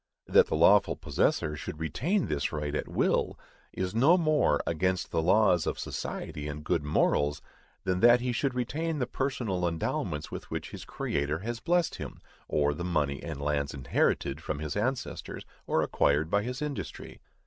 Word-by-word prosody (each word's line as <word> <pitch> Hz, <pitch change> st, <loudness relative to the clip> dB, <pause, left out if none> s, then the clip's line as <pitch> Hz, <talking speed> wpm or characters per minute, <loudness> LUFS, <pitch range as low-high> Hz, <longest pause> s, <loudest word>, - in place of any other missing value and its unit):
That -, -, +5 dB
the -, -, -1 dB
lawful -, -, +5 dB
possessor 75 Hz, -1 st, 0 dB
should 75 Hz, +1 st, -7 dB
retain 145 Hz, -, 0 dB
this 75 Hz, -2 st, -1 dB
right 75 Hz, -1 st, -3 dB
at -, -, -2 dB
will, -, -, +1 dB, 0.3 s
is 90 Hz, 0 st, -3 dB
no 140 Hz, +11 st, +5 dB
more 155 Hz, -, +3 dB
against 90 Hz, +2 st, 0 dB
the 80 Hz, -, +1 dB
laws 90 Hz, -1 st, +4 dB
of -, -, -1 dB
society 75 Hz, 0 st, -5 dB
and 75 Hz, 0 st, -6 dB
good 75 Hz, 0 st, 0 dB
morals, 75 Hz, 0 st, +1 dB, 0.4 s
than 90 Hz, -1 st, 0 dB
that 120 Hz, +3 st, +7 dB
he 125 Hz, 0 st, -1 dB
should 125 Hz, +2 st, -1 dB
retain 155 Hz, +6 st, -2 dB
the 130 Hz, -, 0 dB
personal 115 Hz, -10 st, -1 dB
endowments 75 Hz, -2 st, -2 dB
with -, -, -7 dB
which -, -, -5 dB
his -, -, -8 dB
Creator 75 Hz, +3 st, -2 dB
has 115 Hz, +2 st, -4 dB
blessed 175 Hz, +2 st, +1 dB
him, -, -, -7 dB, 0.3 s
or 75 Hz, -1 st, +1 dB
the 85 Hz, -, -5 dB
money 75 Hz, -6 st, 0 dB
and 80 Hz, -4 st, -6 dB
lands 70 Hz, -1 st, -1 dB
inherited 70 Hz, +2 st, 0 dB
from 75 Hz, -2 st, -3 dB
his 75 Hz, 0 st, -4 dB
ancestors, 120 Hz, +5 st, -3 dB, 0.2 s
or -, -, +2 dB
acquired 75 Hz, +3 st, +1 dB
by 100 Hz, -, +3 dB
his 125 Hz, +6 st, -4 dB
industry. 100 Hz, -, -6 dB
85 Hz, 170 wpm, -29 LUFS, 75-125 Hz, 0.4 s, that